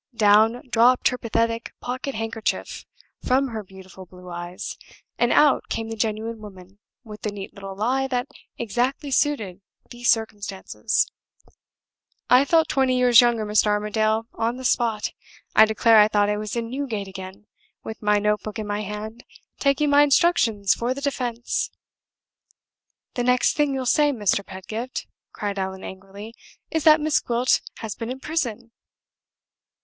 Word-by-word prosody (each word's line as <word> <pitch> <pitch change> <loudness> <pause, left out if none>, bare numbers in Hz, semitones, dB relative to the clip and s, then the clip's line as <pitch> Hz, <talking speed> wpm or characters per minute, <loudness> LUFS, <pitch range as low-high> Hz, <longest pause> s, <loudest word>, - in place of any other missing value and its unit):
Down 220 +3 +4
dropped 245 +1 +4
her 250 - -4
pathetic 230 0 -1
pocket 260 +2 -4
handkerchief 225 0 -3 0.4
from 265 +1 +2
her 220 -2 -5
beautiful 190 -1 -13
blue 180 0 -13
eyes, 175 +1 -6 0.4
and 240 - +3
out 295 -2 +4
came 225 0 -3
the 225 - -4
genuine 220 +1 -2
woman 190 -1 -13 0.2
with 215 -3 -11
the 215 - -2
neat 200 -1 -8
little 195 -1 -8
lie 255 +6 0
that 250 0 -2 0.3
exactly 245 +5 -2
suited 220 - 0 0.3
the 240 0 -11
circumstances! 215 -1 0 1.3
I 255 +3 +7
felt 325 +2 +3
twenty 260 -3 +1
years 250 -1 +7
younger, 235 -3 +1
Mr. 210 0 +2
Armadale, 215 +1 +1
on 230 +2 -2
the 260 - -7
spot. 230 -4 0 0.4
I 220 - +8
declare 220 +1 +4
I 210 - +7
thought 205 -1 +2
I 210 - -1
was 210 +1 -5
in 230 -1 -3
Newgate 245 -7 -3
again, 190 +2 -9 0.4
with 220 - -8
my 210 -1 +3
note 210 0 +1
book 215 0 -7
in 215 - -4
my 205 0 -2
hand, 215 +3 -7 0.4
taking 285 +1 +2
my 285 0 +6
instructions 265 - +3
for 245 +2 -2
the 280 - -7
defense!" 245 -4 -2 1.4
"The 245 - -2
next 250 0 +2
thing 290 -2 +1
you'll 260 -1 -3
say, 295 +3 +3
Mr. 205 -5 0
Pedgift," 215 +7 -6 0.3
cried 205 -1 -4
Allan, 190 0 -4
angrily, 195 +3 -10 0.4
"is 320 -2 -1
that 310 0 +7
Miss 310 -1 +2
Gwilt 240 +1 +1 0.2
has 220 -3 -4
been 230 0 -6
in 260 +1 -5
prison!" 245 -7 -3
225 Hz, 155 wpm, -23 LUFS, 210-250 Hz, 1.4 s, I